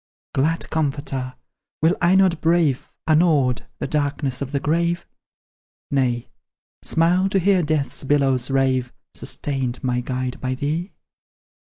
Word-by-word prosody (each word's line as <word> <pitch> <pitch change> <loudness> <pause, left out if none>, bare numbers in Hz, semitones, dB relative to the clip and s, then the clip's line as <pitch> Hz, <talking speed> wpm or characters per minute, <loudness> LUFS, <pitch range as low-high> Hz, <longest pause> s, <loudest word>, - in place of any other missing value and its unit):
Glad 160 +5 0
comforter! 140 -4 -2 0.5
will 165 +3 +4
I 180 +2 +4
not 190 -4 +3
brave, 160 -5 +2 0.2
Unawed, 155 -6 +3
the - - -3
darkness 145 -3 -1
of 135 -1 -3
the 140 - 0
grave? 170 +4 0 0.9
Nay, 125 -4 0 0.5
smile 180 +4 +2
to 195 - +1
hear 190 0 +3
Death's 150 -3 -1
billows 135 -3 +2
rave 130 -2 +1 0.2
Sustained, 130 -3 -3
my 125 -1 +1
guide, 125 0 -3
by 130 0 -1
thee? 155 +8 -2
145 Hz, 125 wpm, -22 LUFS, 130-165 Hz, 0.9 s, will